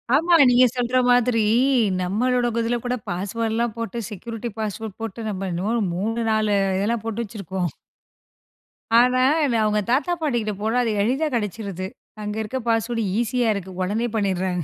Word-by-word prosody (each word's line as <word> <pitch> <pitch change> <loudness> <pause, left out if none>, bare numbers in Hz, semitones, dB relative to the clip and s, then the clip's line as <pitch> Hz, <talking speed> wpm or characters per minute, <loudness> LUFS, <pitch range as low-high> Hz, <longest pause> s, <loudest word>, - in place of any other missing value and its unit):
ஆமா 335 +4 +3
நீங்க 250 +1 +6
சொல்ற 245 +1 +1
மாதிரி 245 -2 +3 0.6
நம்மளோட 240 +7 +1 0.2
இதில 235 +1 0
கூட 245 0 0
பாஸ்வேர்ட்லாம் 225 +5 -2
போட்டு 230 +1 -4
செக்யூரிட்டி 225 +3 -6
பாஸ்வேர்ட் 215 -1 -5
போட்டு 225 0 -5
நம்ம 195 -1 -3
என்னமோ 185 +6 -1 0.2
3,4 215 +1 0 0.2
இதெல்லாம் 215 +3 -1
போட்டு 225 +1 -2
வச்சுருக்கோம். 190 -4 -4 1.3
ஆனா 250 +1 +4 0.4
அவங்க 210 0 +2
தாத்தா 295 +8 +2
பாட்டிகிட்ட 240 -8 0
போனா 220 +3 0
அது 230 - 0
எளிதா 265 +8 +1
கெடைச்சுருது 200 -4 -3 0.4
அங்க 210 0 -4
இருக்க 220 +4 -4
பாஸ்வேர்டு 230 0 0 0.2
ஈஸியா 240 +1 0
இருக்கு 190 -1 -6
உடனே 210 +6 0
பண்ணிடுறாங்க. 185 -4 0
225 Hz, 135 wpm, -23 LUFS, 205-240 Hz, 1.3 s, நீங்க